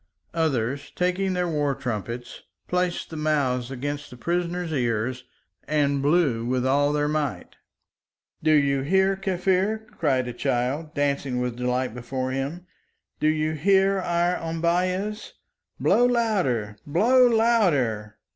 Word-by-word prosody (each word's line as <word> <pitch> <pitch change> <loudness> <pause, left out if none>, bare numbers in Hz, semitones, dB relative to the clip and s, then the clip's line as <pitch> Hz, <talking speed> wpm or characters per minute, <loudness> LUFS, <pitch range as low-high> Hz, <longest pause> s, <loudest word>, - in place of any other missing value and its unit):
Others, 140 -5 -1
taking 185 +1 0
their 180 -1 0
war 145 -4 0
trumpets, 120 +1 -5 0.3
placed 180 -1 -1
the - - -6
mouths 140 -5 0
against 145 +2 -4
the 125 - -12
prisoner's 175 +4 -2
ears 125 -1 -1 0.4
and 140 -2 +1
blew 145 -6 +2
with 125 +1 0
all 145 +2 +3
their 150 0 +1
might. 150 -2 -3 0.8
"Do 155 - +1
you 140 -2 +3
hear, 190 +6 +2
Kaffir?" 195 +3 0
cried 130 -6 +1
a 125 - -4
child, 135 +8 -2
dancing 140 -3 0
with 125 -1 -2
delight 125 -1 -1
before 130 +2 -4
him. 140 +7 -4 0.5
"Do 155 - +2
you 155 0 +1
hear 195 +5 +3
our 175 0 +1
ombeyehs? 180 +5 -1 0.5
Blow 245 +1 +4
louder! 185 - 0
Blow 245 - +5
louder!" 155 - +2
150 Hz, 125 wpm, -25 LUFS, 130-180 Hz, 0.8 s, Blow